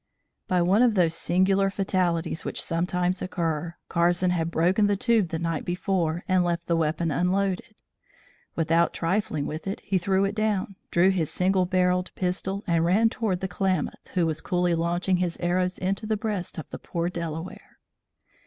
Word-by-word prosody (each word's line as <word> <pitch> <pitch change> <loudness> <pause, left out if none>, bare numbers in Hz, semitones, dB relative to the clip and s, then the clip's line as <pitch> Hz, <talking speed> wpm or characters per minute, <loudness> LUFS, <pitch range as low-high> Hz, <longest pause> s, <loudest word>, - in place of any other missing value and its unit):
By 180 -3 +2
one 195 +6 +3
of 240 -3 +4
those 170 -4 +3
singular 190 +3 +2
fatalities 180 -4 -1
which - - -3
sometimes 180 +2 -1
occur, 170 -2 -2
Carson 175 +1 +2
had 165 -2 0
broken 180 +6 +2
the 205 - +2
tube 225 -4 +2
the 165 - -2
night 165 -1 -2
before, 175 -2 -1
and 185 -1 +3
left 170 -1 -1
the 170 - +1
weapon 160 0 0
unloaded. 190 +6 0 0.8
Without 165 +1 +2
trifling 165 -4 -1
with 155 +5 -5
it, 195 - -3
he 190 -1 0
threw 190 +2 +1
it 195 - -1
down, 210 -2 -1
drew 180 +3 +4
his 170 -5 0
single 185 0 +1
barrelled 180 0 +1
pistol 190 +2 -2
and 170 -3 +2
ran 205 +7 +4
toward 210 -6 -2
the 190 - -1
Klamath, 185 0 -2
who 175 -2 +3
was 160 -1 -2
coolly 180 -2 +1
launching 175 +3 +1
his 175 -2 -1
arrows 180 +1 0
into 195 +3 -2
the 215 0 0
breast 205 -4 -3
of 160 - -6
the - - -6
poor 170 0 -3
Delaware. 170 0 -6
180 Hz, 170 wpm, -26 LUFS, 170-195 Hz, 0.8 s, of